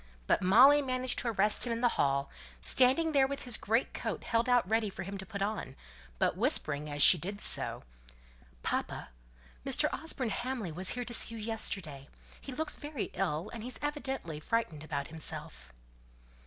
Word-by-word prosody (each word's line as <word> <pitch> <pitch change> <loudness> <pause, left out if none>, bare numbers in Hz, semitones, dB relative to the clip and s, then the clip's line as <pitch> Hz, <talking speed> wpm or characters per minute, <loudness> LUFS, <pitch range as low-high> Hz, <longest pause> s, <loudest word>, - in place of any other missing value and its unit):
But - - +2
Molly 255 +10 +7
managed 255 -2 -1
to - - -2
arrest 215 +1 +2
him - - -2
in 230 0 -2
the 245 - +4
hall, 140 0 +1 0.3
standing 260 - +4
there 275 -3 +4
with 280 0 -5
his 245 -3 +1
great 225 +4 0
coat - - -4
held 230 +1 0
out 245 -5 +3
ready 220 0 +1
for 190 -1 -7
him 195 +2 -6
to 190 - -8
put 200 0 -3
on, 200 -10 -4 0.4
but - - +1
whispering 150 0 0
as 145 -1 +2
she 180 - +9
did 200 +6 -5
so - - -1 0.8
"Papa! - - -3 0.5
Mr. - - +1
Osborne 275 -5 -2
Hamley 240 -5 -3
was 185 +4 0
here 245 - -3
to 240 - -5
see 230 - +2
you - - -7
yesterday. 185 -10 -4 0.3
He 275 - -8
looks 300 +3 0
very 290 -5 -5
ill, 180 -1 -2
and 230 - -6
he's 250 +3 -5
evidently 270 - -3
frightened 160 -5 -2
about 140 -2 -4
himself." 65 - -5
220 Hz, 180 wpm, -31 LUFS, 170-255 Hz, 0.8 s, she